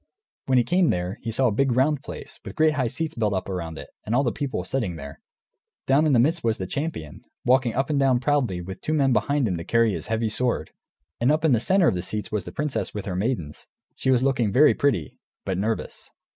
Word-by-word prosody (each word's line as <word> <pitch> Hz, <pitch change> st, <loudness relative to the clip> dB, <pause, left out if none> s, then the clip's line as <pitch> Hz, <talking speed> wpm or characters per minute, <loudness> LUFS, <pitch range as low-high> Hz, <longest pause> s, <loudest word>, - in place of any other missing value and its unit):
When 130 Hz, -1 st, +3 dB
he 120 Hz, -, +5 dB
came 180 Hz, +4 st, +2 dB
there, 90 Hz, +4 st, -2 dB
he 115 Hz, -, -4 dB
saw 120 Hz, +4 st, +1 dB
a 120 Hz, -, +3 dB
big 135 Hz, +4 st, +1 dB
round 135 Hz, +3 st, +2 dB
place -, -, -9 dB
with -, -, -8 dB
great 155 Hz, 0 st, +3 dB
high 130 Hz, -5 st, 0 dB
seats 155 Hz, +7 st, -3 dB
built 105 Hz, -3 st, 0 dB
up 95 Hz, -, -3 dB
around 85 Hz, -4 st, -4 dB
it, -, -, -10 dB
and 110 Hz, -, -1 dB
all 135 Hz, -, +3 dB
the 120 Hz, -, +1 dB
people 135 Hz, -9 st, -3 dB
sitting 100 Hz, -4 st, -2 dB
there. 70 Hz, -3 st, -9 dB, 0.7 s
Down 145 Hz, +4 st, +3 dB
in 145 Hz, -, +3 dB
the 120 Hz, -, +5 dB
midst 155 Hz, +7 st, +2 dB
was 115 Hz, -1 st, +1 dB
the 95 Hz, -, -4 dB
champion, 140 Hz, -, -5 dB, 0.2 s
walking 125 Hz, -2 st, +3 dB
up 135 Hz, +4 st, 0 dB
and 145 Hz, -, +1 dB
down 135 Hz, -3 st, +3 dB
proudly, 125 Hz, -9 st, 0 dB
with 95 Hz, +2 st, -8 dB
two 155 Hz, -, -2 dB
men 135 Hz, -3 st, +3 dB
behind 135 Hz, +4 st, +1 dB
him 90 Hz, -4 st, -1 dB
to 85 Hz, -, -5 dB
carry 115 Hz, +2 st, +2 dB
his -, -, -5 dB
heavy 110 Hz, 0 st, 0 dB
sword. 125 Hz, +3 st, -1 dB, 0.5 s
And 120 Hz, +4 st, +3 dB
up 155 Hz, +1 st, +1 dB
in 155 Hz, -, +4 dB
the 120 Hz, -, +4 dB
centre 185 Hz, -, +3 dB
of -, -, +3 dB
the 90 Hz, -, -2 dB
seats 105 Hz, +3 st, -4 dB
was 105 Hz, -4 st, -2 dB
the -, -, -7 dB
princess, 150 Hz, -6 st, -3 dB
with 105 Hz, -, -4 dB
her 95 Hz, -, -3 dB
maidens; 95 Hz, -, -3 dB, 0.3 s
she -, -, -2 dB
was 130 Hz, -1 st, +3 dB
looking 130 Hz, -6 st, +1 dB
very 145 Hz, +8 st, +6 dB
pretty, 115 Hz, -, -1 dB, 0.3 s
but 95 Hz, -2 st, -2 dB
nervous. 110 Hz, +2 st, -3 dB
120 Hz, 245 wpm, -24 LUFS, 100-140 Hz, 0.7 s, very